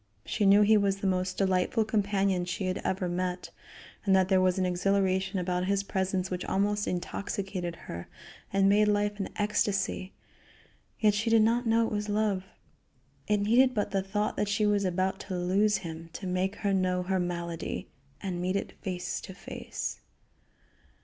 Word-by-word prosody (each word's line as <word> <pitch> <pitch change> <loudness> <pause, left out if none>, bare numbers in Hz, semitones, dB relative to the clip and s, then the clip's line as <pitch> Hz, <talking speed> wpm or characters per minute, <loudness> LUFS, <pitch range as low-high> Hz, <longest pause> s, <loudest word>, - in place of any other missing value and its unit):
She 205 -3 +1
knew 200 +2 +7
he 215 +1 +5
was 200 -1 +2
the 195 - -5
most 185 -1 0
delightful 190 +3 +2
companion 200 -3 +1
she 180 +2 -3
had 185 0 -1
ever 185 -1 -1
met, 180 +1 -3 0.5
and 195 -2 +4
that 190 -1 +3
there 190 -1 +4
was 185 0 +2
an 185 - +1
exhilaration 190 +1 +1
about 180 0 -1
his 200 0 +1
presence 190 -1 -1
which 180 0 -2
almost 205 +1 0
intoxicated 185 -1 -3
her 85 +1 -7 0.4
and 195 0 +3
made 210 +1 +5
life 205 0 +1
an 195 - -2
ecstasy, 200 -2 0 0.9
yet 210 -2 +4
she 215 +3 0
did 225 -1 +5
not 235 +2 +2
know 225 0 +4
it - - -4
was 210 0 -2
love. 205 -3 0 0.8
It 210 -1 +2
needed 250 +5 +4
but 205 -1 0
the 195 -1 +1
thought 205 +2 -2
that 205 - 0
she 205 +1 +1
was 205 -1 +2
about 185 +1 0
to 185 -2 -5
lose 195 +4 +2
him 165 -2 -7
to 195 - -7
make 185 +2 -1
her 200 -1 -1
know 185 -1 +1
her 190 +1 0
malady, 170 -2 -3 0.3
and 180 -3 -3
meet 185 +2 0
it 200 - -2
face 180 -3 -3
to 190 - -9
face. - - -5
195 Hz, 175 wpm, -29 LUFS, 185-205 Hz, 0.9 s, knew